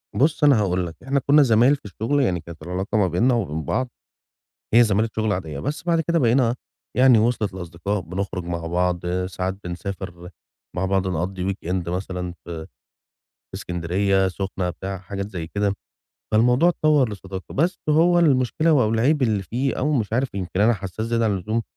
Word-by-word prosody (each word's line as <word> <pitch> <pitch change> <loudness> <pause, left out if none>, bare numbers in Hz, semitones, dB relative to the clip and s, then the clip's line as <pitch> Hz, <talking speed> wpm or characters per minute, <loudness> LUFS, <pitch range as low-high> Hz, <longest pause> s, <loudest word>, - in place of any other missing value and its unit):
بُص 150 +3 +2
أنا 140 -6 +6
هاقول 90 -3 0
لك. 85 - -9
إحنا 135 +2 +1
كنّا 145 +2 +5
زمايل 120 +3 +4
في 140 - -17
الشُغل 115 +8 -1
يعني 90 -8 +1
كانت 85 -1 -11
العلاقة 95 +5 -2
ما 100 -3 +3
بيننا 105 +10 +2
وما 120 - 0
بين 80 +1 -3
بعض 130 - -1 0.9
هي 120 - +8
زمالة 110 0 +2
شُغل 110 -1 +1
عادية، 80 -7 -4
بس 145 - -3
بَعد 170 -2 +2
كده 170 +1 +1
بقينا 120 -2 +3 0.4
يعني 125 -2 +6
وصلت 110 -2 +1
لأصدقاء 90 +3 -3
بنخرُج 90 +1 -4
مع 85 -1 -4
بعض 90 +1 0 0.2
ساعات 95 0 -3
بنسافر 90 0 -6 0.5
مع 90 - 0
بعض 95 0 +1
نقضّي 90 +2 -2
weekend 90 -2 -3
مثلًا 90 0 -3
ف 85 - -19
في 80 -2 -6 0.9
إسكندرية، 95 +3 0
السُخنة 95 -1 -3
بتاع 95 +2 -6
حاجات 100 +1 -5
زي 85 -5 -5
كده، 100 +3 0 0.6
فالموضوع 125 +9 +4
اتطوّر 155 -6 +3
لصداقة 95 -2 -8
بس 170 +4 +1
هو 170 +3 +4
المشكلة 155 0 +3
و 140 -4 +4
أو 110 - +2
العيب 135 +6 +2
اللي 110 -5 +1
فيه 125 +9 -2
أو 150 +3 +1
مش 110 -7 -1
عارف 130 +1 0
يمكن 95 -1 -3
أنا 115 +3 +5
حساس 100 +2 -5
زيادة 115 0 +1
عن 110 - +2
اللزوم، 110 +5 -2
100 Hz, 180 wpm, -23 LUFS, 90-125 Hz, 0.9 s, هي